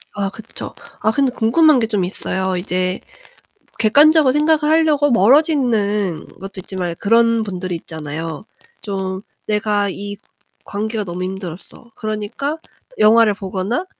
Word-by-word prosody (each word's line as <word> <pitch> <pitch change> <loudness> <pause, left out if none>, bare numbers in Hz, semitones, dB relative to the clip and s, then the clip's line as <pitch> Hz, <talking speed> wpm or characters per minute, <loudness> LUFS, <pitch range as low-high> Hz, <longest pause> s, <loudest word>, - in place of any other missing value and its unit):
아 200 -1 -1
그쵸. 220 +2 -8 0.3
아 215 - +3
근데 270 +2 +1
궁금한게 250 +1 +4
좀 210 -4 0
있어요. 190 0 -2
이제 185 0 -1 0.8
객관적으로 290 +5 +5
생각을 300 +1 +2
하려고 300 -3 +3
멀어지는 220 - +2
것도 195 +1 -8
있지만 180 -2 -4
그런 230 +1 +3
분들이 185 -3 -4
있잖아요. 160 +1 -6 0.4
좀 190 -2 -4 0.3
내가 210 -1 +1
이 205 +1 -6 0.5
관계가 215 +1 -3
너무 180 -1 -5
힘들었어. 190 +4 -8
그러니까 215 +8 -3 0.4
영화를 220 0 +5
보거나 195 - -3
210 Hz, 290 characters per minute, -19 LUFS, 190-240 Hz, 0.8 s, 객관적으로